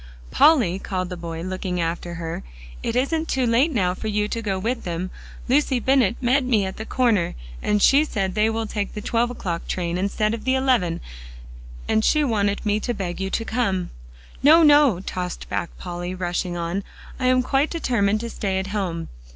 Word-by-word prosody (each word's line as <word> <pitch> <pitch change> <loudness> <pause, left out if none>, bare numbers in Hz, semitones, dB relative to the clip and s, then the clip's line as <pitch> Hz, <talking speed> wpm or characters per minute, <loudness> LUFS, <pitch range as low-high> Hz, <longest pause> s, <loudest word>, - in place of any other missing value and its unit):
"Polly," 235 - +4
called 185 -2 -3
the 180 - -5
boy, 165 -1 -6
looking 185 -1 -3
after 170 +1 -2
her, 165 -1 -4 0.4
"it 230 - -2
isn't 315 +6 0
too 260 -1 0
late 245 +7 +3
now 185 -9 +1
for 220 - -6
you 210 0 0
to 230 - -3
go 200 -3 -1
with 230 +6 -2
them. 175 +1 -3 0.4
Lucy 265 -1 +2
Bennett 255 -4 +3
met 260 +2 +2
me 225 -6 +2
at 190 - -5
the 220 - -6
corner 225 -9 +1 0.3
and 210 -1 +1
she 280 +3 +6
said 195 -10 -2
they 215 +2 +2
will 225 0 -2
take 205 -2 -4
the 210 - -4
twelve 235 +3 +1
o'clock 175 -8 -4
train, 175 -1 -2
instead 215 +3 0
of 230 - -5
the 260 0 +2
eleven, 250 -11 +1 0.9
and 220 - +2
she 305 +5 +3
wanted 205 -6 0
me 210 0 +2
to 240 +2 -2
beg 185 -2 -4
you 190 - -1
to 225 - -2
come." 195 -7 -1 0.5
"No, 320 +4 +7
no," 290 - +5
tossed 180 -2 -5
back 170 - -2
Polly, 175 0 -5
rushing 175 -1 -2
on, 170 +4 -2 0.4
"I 255 - +1
am 255 0 +4
quite 270 +4 +1
determined 215 -10 0
to 235 - -4
stay 195 -2 -2
at 190 - -1
home." 175 -5 -2
210 Hz, 195 wpm, -23 LUFS, 180-250 Hz, 0.9 s, No